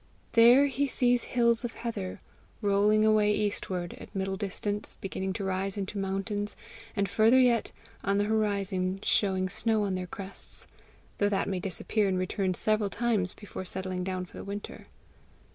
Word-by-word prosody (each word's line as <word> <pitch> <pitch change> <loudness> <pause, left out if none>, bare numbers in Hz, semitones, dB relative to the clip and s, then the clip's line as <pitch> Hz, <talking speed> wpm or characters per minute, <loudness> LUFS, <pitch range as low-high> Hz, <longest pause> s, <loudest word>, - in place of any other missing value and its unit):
There 240 +4 +7
he 280 +1 0
sees 245 -2 +2
hills 235 -1 +2
of 240 - -3
heather 210 -6 -5 0.4
rolling 205 +2 +4
away 215 -1 +4
eastward, 185 -4 -2
at - - -12
middle 195 0 -1
distance 205 +1 -3
beginning 190 0 -3
to 200 0 -4
rise 190 +1 -2
into 200 +1 -3
mountains, 195 +2 -2 0.4
and 200 -2 +1
farther 225 +6 +5
yet, 245 -3 +3 0.3
on 200 0 +1
the 205 - +3
horizon, 200 -3 0
showing 190 -4 +2
snow 220 +3 +1
on 195 -2 -1
their 185 -1 -3
crests 195 +2 -6 0.5
though 205 - +3
that 195 -2 0
may 190 -2 -1
disappear 195 +3 0
and 190 -1 +1
return 185 0 -1
several 215 0 +2
times 215 -5 0
before 205 -2 -7
settling 185 0 -3
down 185 0 -3
for - - -14
the - - -6
winter. 200 +1 -7
200 Hz, 160 wpm, -29 LUFS, 190-220 Hz, 0.5 s, There